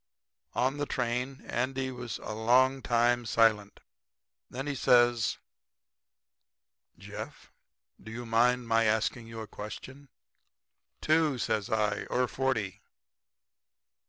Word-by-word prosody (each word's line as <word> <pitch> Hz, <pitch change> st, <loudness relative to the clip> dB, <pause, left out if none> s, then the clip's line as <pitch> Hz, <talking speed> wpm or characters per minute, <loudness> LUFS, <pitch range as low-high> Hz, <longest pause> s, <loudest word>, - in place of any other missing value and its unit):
"On 130 Hz, +3 st, +1 dB
the 145 Hz, 0 st, -2 dB
train 125 Hz, +3 st, -2 dB
Andy 130 Hz, +2 st, -2 dB
was 125 Hz, -3 st, -5 dB
a -, -, -5 dB
long 130 Hz, +5 st, +3 dB
time 120 Hz, 0 st, +2 dB
silent. 110 Hz, -3 st, +2 dB, 0.7 s
Then 135 Hz, +3 st, -5 dB
he 145 Hz, -, -2 dB
says: 120 Hz, -4 st, +3 dB, 1.6 s
'Jeff, -, -, -9 dB, 0.5 s
do 110 Hz, -, -10 dB
you 120 Hz, +2 st, -6 dB
mind 120 Hz, +2 st, +2 dB
my 115 Hz, 0 st, +3 dB
asking 110 Hz, +2 st, 0 dB
you 115 Hz, -1 st, -7 dB
a 110 Hz, -, -7 dB
question?' 130 Hz, +7 st, -9 dB, 0.9 s
"'Two,' 155 Hz, -3 st, +2 dB
says 110 Hz, -2 st, -1 dB
I, 105 Hz, -2 st, 0 dB
'or 125 Hz, 0 st, 0 dB
forty.' 110 Hz, -8 st, -2 dB
120 Hz, 110 wpm, -30 LUFS, 110-130 Hz, 1.6 s, long